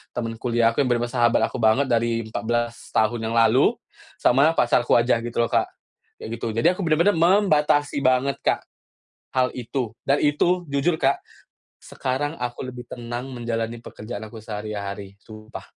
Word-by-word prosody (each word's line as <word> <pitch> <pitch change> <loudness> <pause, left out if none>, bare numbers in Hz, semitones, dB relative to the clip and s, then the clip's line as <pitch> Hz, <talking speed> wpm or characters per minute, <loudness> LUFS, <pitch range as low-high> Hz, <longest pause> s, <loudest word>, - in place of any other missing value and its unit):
temen 115 -2 -3
kuliah 115 -2 +2
aku - - +1
yang 130 - 0
bener-bener 120 0 0
sahabat 120 -1 +3
aku 125 - -5
banget 110 +6 +4
dari 115 -1 +1
14 120 +1 -2 0.2
tahun 110 0 0
yang 115 - -2
lalu, 115 +3 +4 0.4
sama 140 +6 +4
pacarku 120 0 +3
aja 115 -1 +2
gitu 120 0 -6
loh 115 - -1
Kak. - - +2 0.5
Kayak - - -8
gitu - - -2
jadi 170 +10 +3
aku - - -4
bener-bener 165 +6 +3
membatasi 155 -6 +3
banget 130 +1 +2
Kak, - - +1 0.7
hal 130 -1 +2
itu. 125 -1 -3 0.2
Dan 140 +1 +2
itu 175 +5 +2
jujur 140 +5 +1
Kak, 135 0 +2 0.6
sekarang 145 +4 -3
aku 120 +1 -4
lebih 125 -1 -9
tenang 120 +2 -6
menjalani 115 -1 -3
pekerjaan 110 -1 -8
aku 110 +1 -11
sehari-hari 105 -2 -6
sumpah. 110 0 -10
120 Hz, 160 wpm, -23 LUFS, 115-140 Hz, 0.7 s, banget